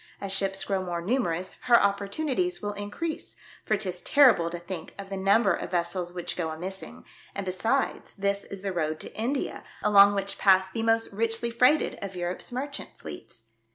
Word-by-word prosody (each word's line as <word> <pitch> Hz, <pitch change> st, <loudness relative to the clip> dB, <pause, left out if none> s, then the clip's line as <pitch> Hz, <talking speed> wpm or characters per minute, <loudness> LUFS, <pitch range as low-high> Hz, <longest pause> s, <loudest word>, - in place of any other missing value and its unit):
As 200 Hz, -1 st, -3 dB
ships 195 Hz, 0 st, +1 dB
grow 195 Hz, -2 st, -1 dB
more 175 Hz, -2 st, -3 dB
numerous, 185 Hz, -5 st, -1 dB
her 240 Hz, -1 st, +7 dB
opportunities 255 Hz, -, 0 dB
will 205 Hz, 0 st, -3 dB
in 205 Hz, 0 st, -5 dB
crease, 320 Hz, +8 st, -4 dB, 0.3 s
for 215 Hz, -, +1 dB
'tis 185 Hz, -3 st, -2 dB
terrible 255 Hz, -, +5 dB
to 175 Hz, -, -5 dB
think 175 Hz, -1 st, -7 dB
of 200 Hz, 0 st, -8 dB
the -, -, -2 dB
num 195 Hz, +4 st, +3 dB
ber -, -, +3 dB
of -, -, -4 dB
vessels 175 Hz, 0 st, -1 dB
which 175 Hz, -1 st, -4 dB
go 165 Hz, -3 st, -2 dB
a 155 Hz, -, -5 dB
missing; 190 Hz, +3 st, -6 dB, 0.3 s
and, 200 Hz, -, -3 dB
besides, 225 Hz, +9 st, -1 dB
this 200 Hz, 0 st, -1 dB
is 195 Hz, -1 st, -9 dB
the 195 Hz, -2 st, -2 dB
road 155 Hz, -2 st, -1 dB
to -, -, -7 dB
India, 250 Hz, +6 st, -2 dB, 0.2 s
along 200 Hz, 0 st, +7 dB
which 200 Hz, 0 st, -2 dB
pass 190 Hz, -1 st, +5 dB
the 225 Hz, -, -2 dB
most 225 Hz, 0 st, +2 dB
richly 230 Hz, +2 st, 0 dB
freighted 250 Hz, +6 st, +3 dB
of 195 Hz, -1 st, -6 dB
Europe's 175 Hz, +4 st, -3 dB
merchant 275 Hz, +3 st, -5 dB
fleets. 80 Hz, +9 st, -10 dB
200 Hz, 190 wpm, -27 LUFS, 180-225 Hz, 0.3 s, her